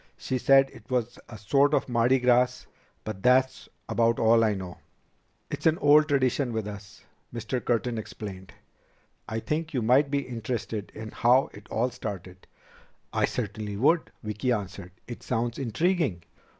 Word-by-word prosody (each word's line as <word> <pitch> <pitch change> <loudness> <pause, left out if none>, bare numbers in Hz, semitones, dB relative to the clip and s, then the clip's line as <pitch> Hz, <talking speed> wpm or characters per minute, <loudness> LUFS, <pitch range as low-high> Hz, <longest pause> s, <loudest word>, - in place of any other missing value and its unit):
"She 130 - -3
said 135 +1 +5
it - - -16
was 125 -2 -2
a 115 - -9
sort 140 +8 +3
of - - 0
Mardi 120 +1 +3
Gras, 125 0 +2 0.4
but 110 -3 -6
that's 130 +2 +2 0.2
about 115 0 +2
all 115 0 +4
I 110 -2 +2
know." 95 -2 -7 0.7
"It's - - -1
an 160 0 +3
old 150 +1 +5
tradition 135 -3 +1
with 110 -2 -2
us," 100 -1 -10 0.3
Mr. 120 +2 -4
Curtin 120 -1 0
explained. 95 -3 -8 0.8
"I 110 - -2
think 155 +5 -3
you 125 - 0
might 130 +5 +4
be 140 0 0
interested 115 -3 -4
in 110 0 -7
how 125 +3 +3
it 100 - -14
all 125 +3 0
started." 95 -5 -8 0.7
"I - - +2
certainly 105 -3 -4
would," 160 - +2
Vicki 105 +4 -2
answered. 95 -5 -4
"It 120 - -8
sounds 120 -1 -2
intriguing." 135 - 0
120 Hz, 155 wpm, -27 LUFS, 105-130 Hz, 0.8 s, said